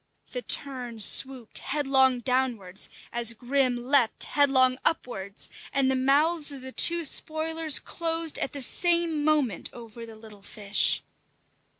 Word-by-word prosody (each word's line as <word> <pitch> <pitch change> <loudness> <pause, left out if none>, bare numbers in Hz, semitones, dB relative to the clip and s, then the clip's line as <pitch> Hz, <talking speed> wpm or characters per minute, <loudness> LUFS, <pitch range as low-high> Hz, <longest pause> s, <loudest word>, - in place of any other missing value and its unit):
The - - -4
tern 255 - -1
swooped 250 +2 +1
headlong 265 -3 +2
downwards 240 -7 -2 0.2
as 235 -1 +1
Grim 255 +1 0
leaped 260 -4 +3
headlong 260 -3 +3
upwards, 200 -10 -2 0.2
and 270 -2 +2
the - - 0
mouths 290 +4 +1
of 270 -2 -7
the 260 - -7
two 340 +5 +3
spoilers 315 +1 -1
closed 330 -1 -1
at - - 0
the 285 - -4
same 335 +1 +1
moment 290 - 0
over 230 -1 -11
the 225 - -12
little 215 -2 -12
fish. 200 0 0
265 Hz, 130 wpm, -26 LUFS, 235-300 Hz, 0.2 s, leaped